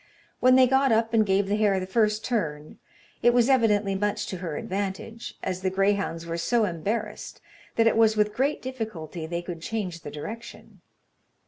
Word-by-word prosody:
When 255 0 +5
they 260 0 +7
got 265 +1 +3
up 225 +1 +2
and 220 -1 +5
gave 195 +1 +2
the 205 +1 +1
hare 205 -3 +2
the 185 - -4
first 215 +2 +1
turn, 155 -11 -3 0.4
it 240 0 +4
was 245 +1 +4
evidently 210 -6 +3
much 205 +1 -1
to 185 - -4
her 170 -4 -4
advantage, 200 +4 -5
as 185 -1 -3
the 185 - +1
greyhounds 195 -3 0
were 170 0 -3
so 230 +5 +2
embarrassed 200 +5 -4 0.4
that 225 - +3
it 225 - +4
was 220 -1 +4
with 210 0 +2
great 275 +4 0
difficulty 200 -11 -5
they 170 +1 -3
could 175 -2 -7
change 185 -3 -3
the 145 - -8
direction. 215 +11 -9
205 Hz, 185 wpm, -26 LUFS, 180-230 Hz, 0.4 s, they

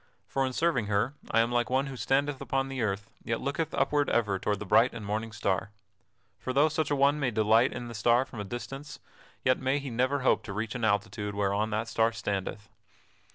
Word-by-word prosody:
For 135 - 0
in - - -3
serving 130 -6 +1
her 105 +6 +1 0.2
I 115 - +4
am 115 +1 0
like 120 0 +1
one 130 +2 +2
who 135 -1 -6
standeth 135 +2 0
upon 135 0 -1
the 135 -2 -3
earth, 105 -2 -2
yet 115 -1 -1
looketh 155 +3 -2
upward 145 -1 +2
ever 105 -5 +1
toward 105 +1 0
the 105 - -6
bright 115 +6 +4
and 115 -3 -7
morning 110 +2 -2
star. 100 -3 -1 0.7
For 130 - -3
though 145 +4 +4
such 155 -1 -1
an 145 - +1
one 140 +2 +3
may 135 -3 +1
delight 110 +2 +3
in 120 - -6
that 115 - -7
star 120 +4 +3
from 125 -4 -10
a - - -2
distance, 135 +7 -7 0.5
yet 130 - +3
may 130 +1 +1
he 140 -2 -5
never 130 +4 +1
hope 130 - +3
to 100 - -5
reach 110 +2 -3
an 125 -3 -5
altitude 105 0 -1
whereon 100 +2 0
that 110 +1 -2
star 115 0 +2
standeth." 105 -1 -3
120 Hz, 220 wpm, -29 LUFS, 105-135 Hz, 0.7 s, I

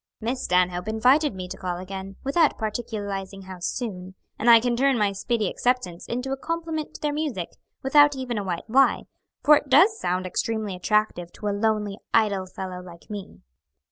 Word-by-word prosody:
"Miss 245 +3 -2
Stanhope 180 0 +1
invited 250 +5 +3
me 185 -1 -5
to - - -7
call 180 -2 -3
again, 190 +1 -7
without 295 +3 +2
particularizing 205 -3 -4
how 185 -1 -9
soon, 185 -2 -4 0.2
and 235 - +3
I 230 -1 +10
can 240 +1 0
turn 270 +1 +3
my 205 -2 +2
speedy 215 +2 -1
acceptance 215 -7 -1
into 250 +3 -3
a 270 - -1
compliment 325 0 -4
to - - -10
their 295 -1 0
music, 290 - -2 0.3
without 290 +1 +5
even 250 -4 -3
a - - -3
white 180 -1 -4
lie, 265 +4 +4 0.4
for 300 - +8
it 290 - -6
does 380 +12 +5
sound 185 +1 -1
extremely 215 +1 -2
attractive 180 -3 0
to 210 - -4
a - - 0
lonely, 210 -1 0 0.2
idle 200 -4 +2
fellow 185 -1 -6
like 175 +2 -13
me." 200 -2 -8
215 Hz, 180 wpm, -25 LUFS, 190-260 Hz, 0.4 s, I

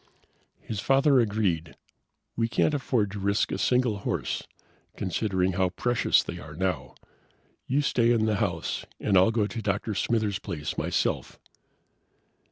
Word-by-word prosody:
His 110 - -5
father 135 +3 +4
agreed. 100 -8 0 0.6
"We 115 0 +1
can't 135 +6 +1
afford 125 -7 0
to 100 - -6
risk 100 +1 +1
a - - -2
single 125 -5 +2
horse, - - -2 0.6
considering 95 0 0
how 95 0 +1
precious 120 +6 +2
they - - -6
are 75 +2 -10
now. 95 +2 -2 0.7
You 140 +3 +2
stay 120 -3 +3
in 115 -2 +3
the 110 -2 +1
house 85 -5 -2 0.2
and 100 - +1
I'll 95 +3 +6
go 110 -2 +1
to 115 +2 -5
Dr. 105 +1 -1
Smithers' 105 -1 0
place 75 -2 -5
myself." - - -1
105 Hz, 145 wpm, -27 LUFS, 95-115 Hz, 0.7 s, I'll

